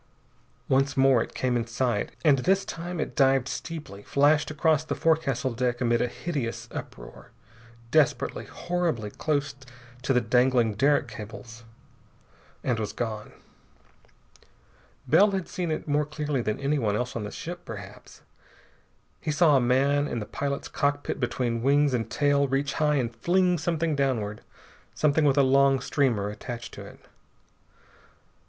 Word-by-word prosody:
Once 135 +1 +1
more 135 -3 +5
it - - -6
came 125 -1 0
in 115 -1 -1
sight, 115 -2 -1
and 140 -4 +5
this 190 +8 +2
time 175 +1 -5
it - - -3
dived 135 -2 +3
steeply, 150 -11 -6
flashed 145 +6 +2
across 155 0 +2
the 155 - -3
forecastle 140 -6 +1
deck 120 0 -1
amid 120 -1 +2
a - - +1
hideous 135 -3 -4
uproar, - - -9 0.6
desperately, 155 -3 +1
horribly 170 -12 -2
close 145 +1 -1 0.5
to 130 - -1
the 125 - +4
dangling 125 -1 +2
derrick 140 +7 +2
cables, 115 +2 -10 1.0
and 120 -3 0
was 105 -2 -3
gone. 110 -3 -4 1.8
Bell 205 +2 +6
had 190 -3 -3
seen 180 -4 -3
it 155 - -3
more 145 0 +1
clearly 150 -3 -2
than 110 -1 -2
anyone 140 -7 0
else 125 +3 -3
on 115 - -3
the 105 - -4
ship, 175 +9 -7
perhaps. 100 -3 -10 1.0
He - - -4
saw 155 0 +4
a 135 - +4
man 140 +4 +2
in 120 - -3
the 105 - -3
pilot's 140 +5 -3
cockpit 145 0 -1
between 120 -2 -1
wings 140 +2 +3
and 115 -3 -1
tail 145 -1 +2
reach 135 +1 -1
high 150 -1 +3
and 120 -4 -1
fling 180 +5 +2
something 160 -1 0
downward, 115 -7 -1 0.5
something 150 0 +2
with 140 -1 +3
a 140 - +6
long 135 0 +4
streamer 125 -7 0
attached 120 +3 -7
to - - -8
it. - - -16
135 Hz, 150 wpm, -26 LUFS, 120-150 Hz, 1.8 s, Bell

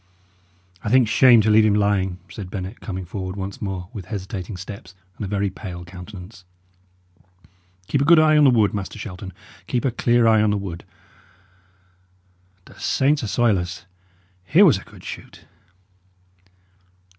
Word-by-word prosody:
"I - - -2
think 125 0 +4
shame 120 0 +6
to 110 +1 +2
leave 110 +1 +6
him 105 -1 +3
lying," 100 -3 +1
said 100 -4 -8
Bennet, 95 +3 -6
coming 95 -4 -5
forward 95 +1 -5
once 100 0 -6
more 95 -3 -4
with 100 -4 -7
hesitating 95 -2 -6
steps 95 0 -10 0.2
and - - -7
a - - -3
very 100 -1 -1
pale 90 -3 -8
countenance. 95 +2 -11 1.4
"Keep 140 +8 0
a - - +2
good 170 +3 +7
eye 155 0 +5
on 150 - +5
the - - +7
wood, 110 -5 +3
Master 100 -2 -5
Shelton 95 -1 -8 0.4
keep 125 0 -1
a 130 - +2
clear 120 0 +2
eye 110 -1 +5
on 110 - +3
the 105 - +1
wood. 95 -4 -7 1.8
The - - -17
saints 145 +2 +1
assoil 110 -2 +1
us! 90 0 -6 0.6
here 170 - +5
was 125 - +4
a - - -13
good - - -16
shoot!" - - -10
100 Hz, 160 wpm, -22 LUFS, 95-115 Hz, 1.8 s, good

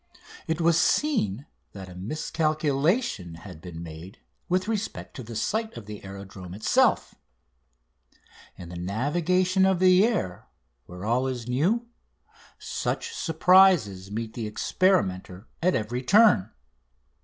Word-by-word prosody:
It 160 +1 -1
was 170 0 +3
seen 145 - +1 0.3
that 95 -2 -9
a 90 - -11
miscalculation 155 - -1
had 85 -1 -11
been 85 -2 -8
made 85 +3 -10 0.3
with 185 +2 +1
respect 220 -1 -4
to - - -6
the 115 0 -9
site 220 - -2
of 115 - -9
the 105 0 -9
aerodrome 95 -2 -9
itself. 110 - +2 1.4
In 85 - -9
the 90 - -8
navigation 175 - +1
of 190 -1 +3
the 185 +1 +5
air, 215 - -1 0.4
where 90 +2 -8
all 125 +4 +1
is 125 -3 -4
new, 175 - +1 0.7
such 460 - -3
surprises 165 - +4
meet 110 +1 -5
the 115 -3 -4
experimenter 100 - 0
at 180 +2 +2
every 115 +3 -2
turn. 200 - +5
125 Hz, 125 wpm, -26 LUFS, -, 1.4 s, the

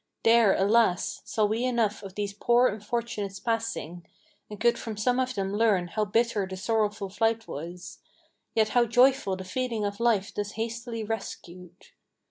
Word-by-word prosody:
There, 225 -3 +5
alas! 205 -2 +2
saw 215 -2 +1
we 220 +3 -1
enough 230 -5 0
of 195 -2 -10
these 205 -1 -3
poor 240 +4 +3
unfortunates 210 -2 -4
passing, 225 -8 -3 0.5
And 210 -1 -8
could 235 0 +2
from 220 -2 -6
some 245 +4 +1
of 255 0 -1
them 195 0 -2
learn 205 -5 +2
how 215 +4 -1
bitter 220 -1 +1
the 190 0 -7
sorrowful 210 -1 0
flight 225 +2 0
was, 175 +4 -8 0.6
Yet 220 -1 +3
how 240 +1 +3
joyful 245 -4 +3
the 190 - -7
feeling 230 +2 -2
of 200 0 -4
life 225 -4 +1
thus 205 0 -4
hastily 230 0 -4
rescued. 180 -4 -7
215 Hz, 160 wpm, -27 LUFS, 195-235 Hz, 0.6 s, There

